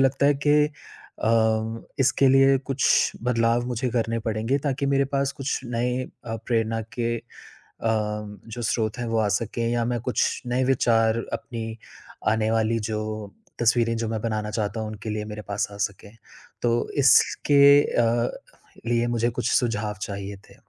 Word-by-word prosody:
लगता 135 Hz, +1 st, +3 dB
है 145 Hz, -, +4 dB
कि 145 Hz, -, +5 dB
अ, 145 Hz, -6 st, -8 dB, 0.7 s
इसके 135 Hz, +1 st, +3 dB
लिए 135 Hz, +1 st, +5 dB
कुछ 135 Hz, 0 st, +2 dB
बदलाव 120 Hz, 0 st, +2 dB
मुझे 125 Hz, +1 st, -2 dB
करने 115 Hz, -1 st, 0 dB
पड़ेंगे, 110 Hz, +5 st, 0 dB
ताकि 140 Hz, -1 st, -2 dB
मेरे 140 Hz, 0 st, +2 dB
पास 140 Hz, 0 st, +1 dB
कुछ 135 Hz, -2 st, -3 dB
नए 125 Hz, +1 st, -1 dB, 0.2 s
अ, 115 Hz, -, -4 dB
प्रेरणा 115 Hz, -1 st, 0 dB, 0.2 s
के 115 Hz, 0 st, 0 dB
अ, -, -, -14 dB, 0.6 s
जो 105 Hz, +1 st, -3 dB
स्रोत 110 Hz, +1 st, -1 dB
हैं, 120 Hz, -, -2 dB
वो 115 Hz, 0 st, 0 dB
आ 110 Hz, -, +2 dB
सकें 115 Hz, +1 st, -3 dB
या 120 Hz, -1 st, 0 dB
मैं 120 Hz, -1 st, -1 dB
कुछ 125 Hz, +1 st, 0 dB
नए 125 Hz, +2 st, +1 dB
विचार 115 Hz, -3 st, +3 dB, 0.2 s
अपनी 115 Hz, -3 st, -5 dB, 0.5 s
आने 110 Hz, 0 st, +1 dB
वाली 115 Hz, 0 st, +1 dB
जो 110 Hz, -1 st, -1 dB, 0.6 s
तस्वीरें 115 Hz, 0 st, +2 dB
जो 115 Hz, 0 st, -2 dB
मैं 110 Hz, -1 st, -3 dB
बनाना 110 Hz, -2 st, -2 dB
चाहता 105 Hz, 0 st, -2 dB
हूँ, 110 Hz, -, -3 dB
उनके 110 Hz, 0 st, -7 dB
लिए 105 Hz, 0 st, -3 dB
मेरे 105 Hz, -, -6 dB
पास 100 Hz, -, -1 dB
आ 100 Hz, -, -10 dB
सकें। 100 Hz, +1 st, -16 dB, 0.5 s
तो 120 Hz, 0 st, +1 dB, 0.2 s
इसके 140 Hz, +2 st, +5 dB, 0.2 s
अ, 120 Hz, 0 st, +1 dB, 0.6 s
लिए 120 Hz, 0 st, +1 dB
मुझे 120 Hz, 0 st, +1 dB
कुछ 120 Hz, +1 st, -2 dB
सुझाव 105 Hz, -3 st, 0 dB
चाहिए 100 Hz, -1 st, -5 dB
थे। -, -, -17 dB
115 Hz, 160 wpm, -24 LUFS, 110-125 Hz, 0.7 s, कि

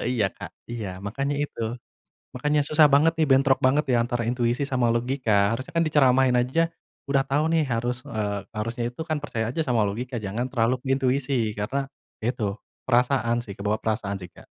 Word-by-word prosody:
Iya, 105 Hz, -4 st, +2 dB
Kak. -, -, -7 dB, 0.2 s
Iya, 110 Hz, -5 st, -4 dB
makanya 135 Hz, +7 st, -2 dB
itu. 120 Hz, -5 st, -3 dB, 0.6 s
Makanya 150 Hz, +3 st, +1 dB
susah 155 Hz, +1 st, +5 dB
banget 145 Hz, +3 st, +4 dB
nih, 155 Hz, -, +3 dB
bentrok 135 Hz, 0 st, +4 dB
banget 140 Hz, +4 st, +3 dB
ya, 120 Hz, -, +4 dB
antara 120 Hz, 0 st, -1 dB
intuisi 120 Hz, +2 st, 0 dB
sama 130 Hz, -3 st, +1 dB
logika. 115 Hz, -4 st, +2 dB
Harusnya 130 Hz, +8 st, -6 dB
kan 165 Hz, -, +4 dB
diceramahin 130 Hz, -4 st, +4 dB
aja, 145 Hz, +7 st, +1 dB, 0.4 s
udah 140 Hz, -1 st, +2 dB
tahu 145 Hz, +3 st, 0 dB
nih 165 Hz, -1 st, +3 dB
harus, 120 Hz, +1 st, -1 dB
eee, 105 Hz, -4 st, -2 dB, 0.2 s
harusnya 115 Hz, +3 st, -2 dB
itu 125 Hz, -, -12 dB
kan 155 Hz, -2 st, -1 dB
percaya 110 Hz, -5 st, -2 dB
aja 160 Hz, -, -2 dB
sama 120 Hz, -7 st, +1 dB
logika, 120 Hz, +5 st, -3 dB
jangan 105 Hz, +5 st, -2 dB
terlalu 120 Hz, -2 st, +2 dB
ke -, -, -14 dB
intuisi. 135 Hz, +1 st, 0 dB, 0.2 s
Karena 130 Hz, +7 st, -2 dB, 0.4 s
ya -, -, -2 dB
itu, 100 Hz, -2 st, -2 dB, 0.3 s
perasaan 125 Hz, -1 st, +2 dB
sih, 100 Hz, -, -7 dB
kebawa 105 Hz, +2 st, -1 dB
perasaan 105 Hz, -3 st, -2 dB
sih, 90 Hz, -1 st, -10 dB
Kak. -, -, -16 dB
125 Hz, 185 wpm, -25 LUFS, 115-140 Hz, 0.6 s, susah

